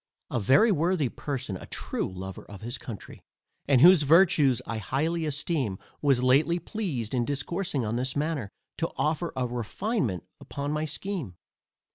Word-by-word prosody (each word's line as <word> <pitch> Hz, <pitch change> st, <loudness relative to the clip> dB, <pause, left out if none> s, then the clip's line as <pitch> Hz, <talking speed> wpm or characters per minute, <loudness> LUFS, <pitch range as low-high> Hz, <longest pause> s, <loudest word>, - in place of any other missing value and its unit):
A -, -, 0 dB
very 140 Hz, -, +5 dB
worthy 165 Hz, -4 st, +1 dB
person, 135 Hz, -8 st, -4 dB
a -, -, -11 dB
true -, -, -3 dB
lover 95 Hz, 0 st, -7 dB
of 100 Hz, 0 st, -11 dB
his 120 Hz, +2 st, -4 dB
country, 110 Hz, -7 st, -9 dB, 0.5 s
and 135 Hz, -3 st, +5 dB
whose 175 Hz, +1 st, +8 dB
virtues 150 Hz, -, +5 dB
I 115 Hz, -1 st, -3 dB
highly 155 Hz, +9 st, -1 dB
esteem, 140 Hz, -, -1 dB, 0.2 s
was 135 Hz, -4 st, +3 dB
lately 145 Hz, +7 st, +4 dB
pleased 165 Hz, -, -4 dB
in 125 Hz, -2 st, +2 dB
discoursing 145 Hz, +1 st, -2 dB
on 110 Hz, +2 st, -1 dB
this 130 Hz, +1 st, -1 dB
matter, 145 Hz, -7 st, -1 dB, 0.3 s
to 165 Hz, -, 0 dB
offer 160 Hz, +3 st, 0 dB
a 130 Hz, -, 0 dB
refinement 120 Hz, -, -2 dB, 0.2 s
upon 145 Hz, 0 st, -4 dB
my 150 Hz, +1 st, -1 dB
scheme. 155 Hz, -, -4 dB
140 Hz, 155 wpm, -27 LUFS, 120-165 Hz, 0.5 s, whose